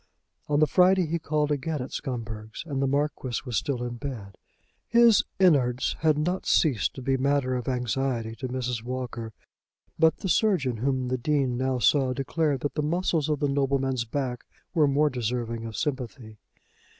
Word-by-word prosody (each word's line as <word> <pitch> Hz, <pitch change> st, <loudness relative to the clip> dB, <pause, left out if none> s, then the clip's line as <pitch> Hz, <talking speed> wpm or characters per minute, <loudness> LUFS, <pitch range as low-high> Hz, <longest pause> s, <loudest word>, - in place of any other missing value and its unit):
On 145 Hz, 0 st, +2 dB
the 155 Hz, -, +6 dB
Friday 185 Hz, +2 st, +4 dB
he 165 Hz, +2 st, -2 dB
called 150 Hz, -1 st, 0 dB
again 150 Hz, +2 st, -1 dB
at 125 Hz, -, -5 dB
Scumberg's, 110 Hz, -4 st, -5 dB
and 140 Hz, -4 st, -3 dB
the 135 Hz, -, +2 dB
Marquis 140 Hz, -3 st, -1 dB
was 125 Hz, -3 st, -4 dB
still 125 Hz, +2 st, -1 dB
in 120 Hz, 0 st, -4 dB
bed. 115 Hz, -8 st, -6 dB, 0.5 s
His 235 Hz, -2 st, +5 dB, 0.2 s
"in'ards" 135 Hz, -9 st, +3 dB
had 155 Hz, -2 st, +3 dB
not 175 Hz, +5 st, -1 dB
ceased 130 Hz, -, +2 dB
to 130 Hz, -, -7 dB
be 135 Hz, +1 st, +1 dB
matter 135 Hz, -1 st, +1 dB
of 125 Hz, -2 st, -4 dB
anxiety 125 Hz, -2 st, -1 dB
to 130 Hz, -, -4 dB
Mrs. 125 Hz, -2 st, -3 dB
Walker; 120 Hz, -2 st, -5 dB, 0.7 s
but 160 Hz, 0 st, +4 dB
the -, -, -4 dB
surgeon, 170 Hz, -, +2 dB
whom 130 Hz, +1 st, -1 dB
the 130 Hz, 0 st, -1 dB
Dean 135 Hz, -1 st, +1 dB
now 130 Hz, +1 st, 0 dB
saw, 130 Hz, +3 st, +3 dB
declared 140 Hz, +1 st, -1 dB
that 145 Hz, -, -2 dB
the 150 Hz, -, -1 dB
muscles 160 Hz, -1 st, 0 dB
of 150 Hz, -2 st, -1 dB
the 145 Hz, -, +2 dB
nobleman's 135 Hz, -3 st, 0 dB
back 125 Hz, 0 st, -3 dB, 0.3 s
were 155 Hz, -4 st, +4 dB
more 145 Hz, +2 st, +2 dB
deserving 115 Hz, -1 st, -3 dB
of 110 Hz, -1 st, -6 dB
sympathy. 125 Hz, -6 st, -4 dB
135 Hz, 175 wpm, -26 LUFS, 125-150 Hz, 0.7 s, the